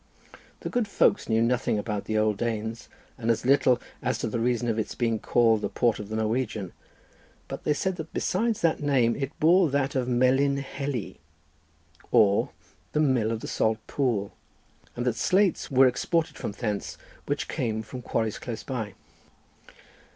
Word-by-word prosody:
The - - -4
good 245 -3 0
folks 200 -4 +2
knew 110 0 +3
nothing 120 -2 +1
about 105 -1 -3
the 110 - -1
old 110 -1 +2
Danes, 115 0 -3 0.3
and 115 -1 -2
as 115 +1 +1
little 130 -2 +4 0.2
as 130 - 0
to - - -2
the 115 +1 -2
reason 120 0 0
of 115 -1 0
its 110 - -3
being 115 -3 0
called 115 -2 +3
the - - -2
port 120 -3 +1
of 105 -1 -7
the 110 - -3
Norwegian—but 110 -3 -5
they 150 - +2
said 190 +3 -1
that 160 0 -7
besides 225 +3 0
that 165 -2 +2
name 130 -5 +2
it 140 +2 -5
bore 170 +2 +5
that 140 0 0
of 130 -2 0
Melin 130 +3 +3
Heli, 135 -7 -4 0.9
or 105 -4 +4 0.4
the - - +1
mill 130 -7 +2
of 115 -1 -3
the - - -6
salt 110 0 +1
pool, 115 -8 -1 0.6
and 120 - -3
that 125 - +2
slates 190 -1 +2
were 135 0 +6
exported 160 +6 +1
from - - -5
thence, 105 -2 -3 0.3
which - - -1
came 110 -1 -2
from 125 +4 -8
quarries 110 -2 -2
close 115 -3 -6
by. 115 -7 -4
120 Hz, 170 wpm, -27 LUFS, 110-140 Hz, 0.9 s, were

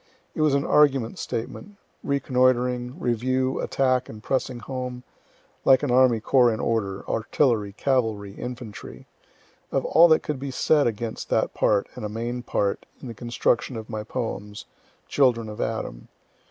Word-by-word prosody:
It - - -3
was 150 -2 +3
an 140 - 0
argument 135 -6 +3
statement, 195 - -5 0.3
reconnoitring, 125 0 +1
review, 130 0 0
attack, 130 -1 +1
and 110 0 -10
pressing 130 0 -1
home, 125 +1 -6 0.6
(like 135 +1 +5
an 140 - 0
army 125 -2 +5
corps 120 +2 +4
in 110 - -3
order, 100 -4 -2
artillery, 110 -3 +1
cavalry, 110 -5 0
infantry,) 115 - -8 0.7
of - - 0
all 170 +2 +6
that 160 -1 +4
could 150 -3 -3
be 140 +1 -4
said 145 +2 +2
against 115 0 -4
that - - +1
part 100 -2 +2
(and - - -8
a 105 - -3
main 120 +3 -4
part) 100 -4 -1
in 130 - -8
the - - -6
construction 120 +2 -1
of 110 0 -8
my 110 -1 -3
poems, 105 -3 -5 0.4
"Children 120 -5 +2
of 105 - -6
Adam." - - -4
125 Hz, 155 wpm, -25 LUFS, 110-130 Hz, 0.7 s, all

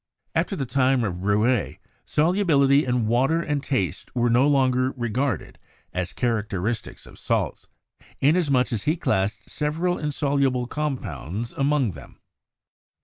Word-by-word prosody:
After 195 - 0
the 140 -7 -2
time 130 -1 +2
of 90 -3 -3
Rouelle, 105 +3 +2 0.3
solubility 150 -5 +3
in 125 -2 +1
water 130 +9 +2
and 150 -4 -2
taste 95 - -2
were 120 -1 +2
no 125 +4 +4
longer 130 -2 +2
regarded 120 - -2 0.3
as 90 -1 -2
characteristics 110 -2 -2
of - - -14
salts, - - -1 0.5
inasmuch 140 -5 +2
as 105 - -3
he 155 - +2
classed 105 -3 -1
several 165 +4 -1
insoluble 140 -4 0
compounds 120 - -4
among 140 -5 +1
them. 70 -6 -13
130 Hz, 125 wpm, -24 LUFS, 110-145 Hz, 0.5 s, no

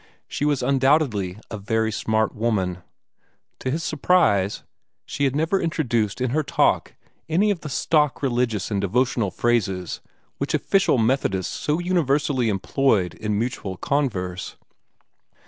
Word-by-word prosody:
She 145 - -2
was 145 -4 +1
undoubtedly 130 - +2
a 110 - -5
very 110 +2 0
smart 110 0 0
woman. 100 -6 -1 0.8
To 130 - -3
his 160 +5 -2
surprise 145 - +2 0.4
she 140 - -1
had 135 0 0
never 165 +6 +1
introduced 120 -11 0
in 130 -1 0
her 155 +4 +2
talk 150 - +1 0.3
any 195 +6 +3
of 195 - -2
the 150 - -7
stock 150 +1 +1
religious 120 -5 0
and 100 -2 0
devotional 120 +1 +1
phrases 95 -5 -1 0.4
which - - -1
official 195 -8 +2
Methodists 110 -6 0
so 150 +1 -1
universally 145 -8 +1
employed 100 -1 +1
in 105 -1 -2
mutual 110 -5 -3
converse. 95 -12 -2
125 Hz, 130 wpm, -23 LUFS, 105-145 Hz, 0.8 s, any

